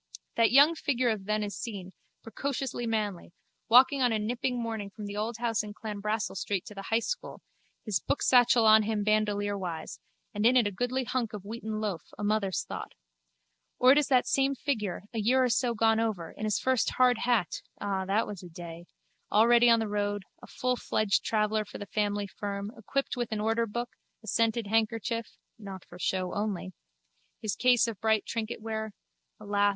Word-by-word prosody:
That 230 Hz, -1 st, +4 dB
young 285 Hz, +5 st, +7 dB
figure 255 Hz, -6 st, 0 dB
of 205 Hz, -3 st, -4 dB
then 215 Hz, +1 st, 0 dB
is 205 Hz, -1 st, -4 dB
seen, 195 Hz, -6 st, -6 dB, 0.3 s
precociously 265 Hz, 0 st, -3 dB
manly, 210 Hz, -6 st, -2 dB, 0.4 s
walking 260 Hz, +3 st, +6 dB
on 245 Hz, -2 st, +3 dB
a 220 Hz, -, +1 dB
nipping 245 Hz, +3 st, -2 dB
morning 225 Hz, -3 st, -4 dB
from 210 Hz, +1 st, -9 dB
the 205 Hz, 0 st, -6 dB
old 220 Hz, +2 st, -2 dB
house 230 Hz, -1 st, 0 dB
in 210 Hz, -1 st, -8 dB
Clanbrassil 210 Hz, -1 st, -3 dB
street 195 Hz, -2 st, -2 dB
to -, -, -9 dB
the 195 Hz, -1 st, -8 dB
high 225 Hz, -, +3 dB
school, -, -, -4 dB, 0.5 s
his 210 Hz, -5 st, 0 dB
booksatchel 245 Hz, -3 st, +4 dB
on 220 Hz, 0 st, +8 dB
him 215 Hz, -1 st, -1 dB
bandolierwise, 205 Hz, -5 st, -1 dB, 0.3 s
and 210 Hz, -, -2 dB
in 245 Hz, +3 st, +5 dB
it 240 Hz, -, +4 dB
a 205 Hz, -, 0 dB
goodly 245 Hz, +6 st, -1 dB
hunk 240 Hz, -3 st, -2 dB
of 200 Hz, -2 st, -7 dB
wheaten 220 Hz, 0 st, -5 dB
loaf, 200 Hz, -7 st, -2 dB, 0.2 s
a -, -, -5 dB
mother's 205 Hz, -2 st, 0 dB
thought. -, -, -7 dB, 0.8 s
Or 255 Hz, +1 st, +6 dB
it 285 Hz, -, +6 dB
is 295 Hz, -, 0 dB
the 255 Hz, -2 st, +4 dB
same 275 Hz, 0 st, +1 dB
figure, 215 Hz, -11 st, -2 dB
a 225 Hz, -, -2 dB
year 255 Hz, +5 st, +3 dB
or 250 Hz, -, +2 dB
so 240 Hz, 0 st, +1 dB
gone 225 Hz, 0 st, +3 dB
over, 205 Hz, -8 st, -2 dB
in 215 Hz, -, -6 dB
his 215 Hz, -, +1 dB
first 260 Hz, -2 st, +1 dB
hard 250 Hz, -2 st, +4 dB
hat 230 Hz, -9 st, 0 dB, 0.2 s
(ah, 195 Hz, -2 st, -1 dB
that 200 Hz, +4 st, +1 dB
was 205 Hz, -4 st, -7 dB
a 180 Hz, -, -10 dB
day!), 170 Hz, 0 st, -9 dB, 0.5 s
already 235 Hz, +3 st, +6 dB
on 230 Hz, -, +6 dB
the 220 Hz, -, -1 dB
road, 205 Hz, -1 st, -1 dB, 0.2 s
a -, -, -12 dB
fullfledged 240 Hz, -4 st, 0 dB
traveller 215 Hz, 0 st, +1 dB
for 205 Hz, -, -10 dB
the 205 Hz, -, -7 dB
family 205 Hz, 0 st, -1 dB
firm, 200 Hz, +1 st, -5 dB
equipped 275 Hz, +5 st, -2 dB
with 240 Hz, -2 st, -3 dB
an 215 Hz, -, -1 dB
orderbook, 230 Hz, +2 st, -1 dB, 0.3 s
a -, -, -12 dB
scented 230 Hz, +1 st, +1 dB
handkerchief 225 Hz, +1 st, -1 dB, 0.2 s
(not 195 Hz, -3 st, -9 dB
for 175 Hz, -, -13 dB
show 185 Hz, 0 st, -1 dB
only), 200 Hz, -3 st, -3 dB, 0.7 s
his 215 Hz, -2 st, -2 dB
case 250 Hz, -2 st, +4 dB
of 220 Hz, -5 st, -6 dB
bright 220 Hz, -1 st, +2 dB
trinketware 220 Hz, -1 st, -4 dB, 0.5 s
(alas! 205 Hz, -1 st, +2 dB
220 Hz, 185 wpm, -29 LUFS, 205-235 Hz, 0.8 s, on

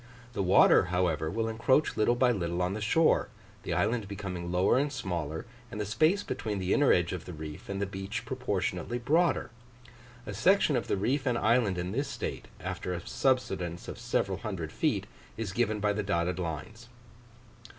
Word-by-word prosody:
The 100 Hz, -, -1 dB
water, 95 Hz, 0 st, +6 dB
however, 90 Hz, -3 st, 0 dB
will 115 Hz, +5 st, -1 dB
encroach 115 Hz, +6 st, +2 dB
little 110 Hz, +3 st, +3 dB
by 125 Hz, 0 st, +4 dB
little 90 Hz, -4 st, -1 dB
on 90 Hz, +2 st, 0 dB
the 110 Hz, -, -4 dB
shore, 155 Hz, +10 st, +3 dB, 0.3 s
the -, -, -3 dB
island 110 Hz, -1 st, 0 dB
becoming 90 Hz, -3 st, -5 dB
lower 90 Hz, +7 st, +3 dB
and 145 Hz, +1 st, 0 dB
smaller, 85 Hz, -, -3 dB, 0.2 s
and 115 Hz, -, -7 dB
the 105 Hz, -, -1 dB
space 155 Hz, -, +2 dB
between 105 Hz, -2 st, -3 dB
the 95 Hz, 0 st, 0 dB
inner 145 Hz, -2 st, +4 dB
edge 90 Hz, 0 st, +2 dB
of 90 Hz, -3 st, -5 dB
the 90 Hz, -, -7 dB
reef 75 Hz, 0 st, -8 dB
and 100 Hz, 0 st, -3 dB
the 100 Hz, -, 0 dB
beach 95 Hz, +1 st, -5 dB
proportionately 110 Hz, -4 st, -2 dB
broader. 155 Hz, +5 st, +1 dB, 0.7 s
A 105 Hz, -, -5 dB
section 155 Hz, -, +3 dB
of 120 Hz, -, -1 dB
the -, -, 0 dB
reef 130 Hz, +7 st, 0 dB
and 120 Hz, -2 st, +2 dB
island 110 Hz, -5 st, +2 dB
in 90 Hz, +1 st, -3 dB
this 140 Hz, +7 st, -1 dB
state, -, -, -5 dB
after 90 Hz, -, -4 dB
a 85 Hz, -, -7 dB
subsidence 95 Hz, -10 st, 0 dB
of -, -, -7 dB
several 95 Hz, -1 st, -1 dB
hundred 95 Hz, -8 st, -4 dB
feet, -, -, 0 dB, 0.3 s
is 110 Hz, -4 st, -3 dB
given 110 Hz, 0 st, 0 dB
by 105 Hz, 0 st, +1 dB
the 105 Hz, -, -1 dB
dotted 90 Hz, -2 st, -1 dB
lines. 95 Hz, -, -5 dB
100 Hz, 185 wpm, -30 LUFS, 90-120 Hz, 0.7 s, water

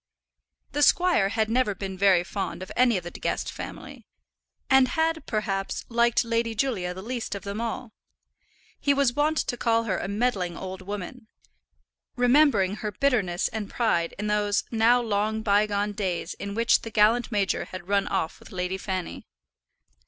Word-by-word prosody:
The 290 Hz, -, -1 dB
squire 345 Hz, -, +4 dB
had 220 Hz, 0 st, 0 dB
never 225 Hz, -3 st, +1 dB
been 190 Hz, 0 st, -5 dB
very 190 Hz, -2 st, +4 dB
fond 185 Hz, -2 st, -4 dB
of 185 Hz, -, -10 dB
any 245 Hz, -4 st, +4 dB
of 180 Hz, -, -5 dB
the 175 Hz, -, -7 dB
De -, -, -10 dB
Guest -, -, -2 dB
family, -, -, -9 dB, 0.6 s
and 265 Hz, -1 st, +5 dB
had, 320 Hz, +2 st, 0 dB
perhaps, 195 Hz, -3 st, -2 dB
liked 235 Hz, 0 st, +3 dB
Lady 230 Hz, 0 st, -1 dB
Julia 200 Hz, -7 st, -1 dB
the 190 Hz, -, -8 dB
least 235 Hz, -2 st, -4 dB
of 200 Hz, -, -7 dB
them 200 Hz, +2 st, -4 dB
all. 235 Hz, 0 st, -4 dB, 0.9 s
He 285 Hz, -1 st, +2 dB
was 275 Hz, -3 st, +2 dB
wont 300 Hz, +3 st, +1 dB
to 245 Hz, -, -1 dB
call 230 Hz, -1 st, +2 dB
her 195 Hz, -5 st, -1 dB
a -, -, -4 dB
meddling 200 Hz, -5 st, -1 dB
old 190 Hz, 0 st, -6 dB
woman, 205 Hz, +4 st, -7 dB, 0.9 s
remembering 245 Hz, -6 st, +3 dB
her 210 Hz, -1 st, -4 dB
bitterness 200 Hz, -7 st, +1 dB
and 215 Hz, -3 st, -5 dB
pride 175 Hz, -8 st, 0 dB
in 210 Hz, -, -4 dB
those 210 Hz, -1 st, +1 dB
now 230 Hz, +2 st, +4 dB
long 220 Hz, -1 st, -1 dB
bygone 205 Hz, 0 st, +2 dB
days 185 Hz, -4 st, -3 dB
in 200 Hz, 0 st, -6 dB
which 230 Hz, +1 st, +3 dB
the 225 Hz, -, -6 dB
gallant 225 Hz, +3 st, +3 dB
major 200 Hz, -3 st, 0 dB
had 185 Hz, -1 st, -9 dB
run 200 Hz, 0 st, +1 dB
off 160 Hz, -, -2 dB
with -, -, -15 dB
Lady 185 Hz, +1 st, -3 dB
Fanny. 185 Hz, -2 st, -5 dB
210 Hz, 170 wpm, -26 LUFS, 195-240 Hz, 0.9 s, and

